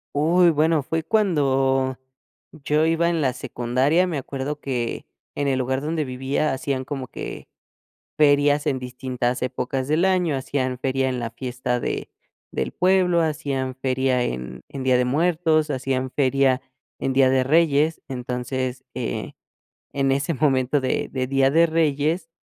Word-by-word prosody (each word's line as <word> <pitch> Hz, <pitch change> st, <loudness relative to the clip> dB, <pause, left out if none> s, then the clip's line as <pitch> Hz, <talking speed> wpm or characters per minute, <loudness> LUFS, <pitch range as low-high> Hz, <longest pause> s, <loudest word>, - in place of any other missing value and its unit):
Uy, 170 Hz, +4 st, +4 dB
bueno, 155 Hz, 0 st, +2 dB
fue 160 Hz, +4 st, -2 dB
cuando 135 Hz, -, +1 dB, 0.5 s
yo 150 Hz, +1 st, 0 dB
iba 165 Hz, +1 st, +2 dB
en 165 Hz, -2 st, 0 dB
la 130 Hz, -2 st, +2 dB
secundaria. 130 Hz, +7 st, +1 dB
Me 160 Hz, -5 st, -2 dB
acuerdo 140 Hz, +2 st, -4 dB
que 125 Hz, -5 st, -3 dB, 0.3 s
en 145 Hz, -1 st, -1 dB
el 130 Hz, -1 st, +1 dB
lugar 130 Hz, +1 st, -1 dB
donde 155 Hz, +1 st, -1 dB
vivía 135 Hz, +3 st, -1 dB
hacían 130 Hz, 0 st, -2 dB
como 135 Hz, -3 st, -5 dB
que -, -, -7 dB, 0.7 s
ferias 145 Hz, 0 st, +4 dB
en 135 Hz, -, +1 dB
distintas 125 Hz, -1 st, -3 dB
épocas 130 Hz, +1 st, -2 dB
del 155 Hz, +4 st, +2 dB
año. 180 Hz, -6 st, +2 dB
Hacían 130 Hz, -1 st, -2 dB
feria 130 Hz, +1 st, 0 dB
en 125 Hz, -1 st, -2 dB
la 115 Hz, -1 st, -3 dB
fiesta 125 Hz, 0 st, -3 dB
de -, -, -3 dB, 0.4 s
del -, -, -2 dB
pueblo, 180 Hz, -2 st, +3 dB
hacían 135 Hz, -4 st, -2 dB
feria 130 Hz, -1 st, 0 dB
en 65 Hz, -, -5 dB
en 135 Hz, -2 st, -6 dB
Día 130 Hz, -1 st, +3 dB
de 125 Hz, -, +2 dB
Muertos, 155 Hz, +2 st, +2 dB
hacían 130 Hz, -1 st, -2 dB
feria 135 Hz, -1 st, +2 dB, 0.4 s
en 135 Hz, -, -1 dB
Día 130 Hz, -1 st, +5 dB
de 130 Hz, -1 st, +3 dB
Reyes. 155 Hz, 0 st, +3 dB
Entonces, 125 Hz, +1 st, -3 dB
eh, 60 Hz, -, -4 dB, 0.6 s
en 135 Hz, -1 st, +1 dB
ese 140 Hz, +3 st, 0 dB
momento 135 Hz, -1 st, +2 dB
de 130 Hz, -, -1 dB
de 130 Hz, -1 st, -1 dB
Día 135 Hz, 0 st, +3 dB
de 165 Hz, +2 st, +5 dB
Reyes, 160 Hz, +1 st, 0 dB
135 Hz, 150 wpm, -23 LUFS, 130-155 Hz, 0.7 s, Día